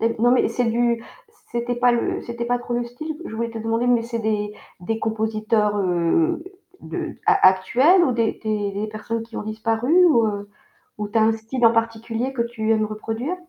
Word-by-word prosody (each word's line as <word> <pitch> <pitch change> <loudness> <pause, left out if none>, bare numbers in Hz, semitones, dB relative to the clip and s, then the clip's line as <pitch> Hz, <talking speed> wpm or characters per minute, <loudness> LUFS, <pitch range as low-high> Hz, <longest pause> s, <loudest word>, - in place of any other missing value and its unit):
Et 230 +1 +1
non 240 +1 +4
mais 250 - +3
c'est 240 +2 -1
du 235 0 +1 0.5
c'était 240 +1 -2
pas 245 0 +3
le 235 - -1
c'était 235 0 -5
pas 245 +1 0
trop 240 0 -5
le 240 0 0
style, 295 +6 -6
je 220 - -7
voulais 230 +1 -2
te 225 - -6
demander, 225 +2 -1
mais 245 -2 +3
c'est 230 0 -4
des 210 -1 -1 0.3
des 220 +5 -2
compositeurs, 215 -1 0
heu, 195 - +1 0.4
de - - -5
a 415 - +7
actuels 255 - +4
ou 260 - +1
des 230 -2 0
des 210 -2 -1
des 205 +2 -3
personnes 220 +1 -4
qui 230 0 -11
ont - - -3
disparu 225 +4 -1
ou, 235 -9 +4
heu, 205 -1 -4 0.5
ou 210 -1 -3
tu 220 - -1
as - - +4
un 225 +1 +4
style 225 +3 -1
en 230 - +6
particulier 230 +2 -1
que 240 - -1
tu 225 -2 -1
aimes 215 -1 +2
reproduire? 225 +9 -4
230 Hz, 210 wpm, -22 LUFS, 215-240 Hz, 0.5 s, a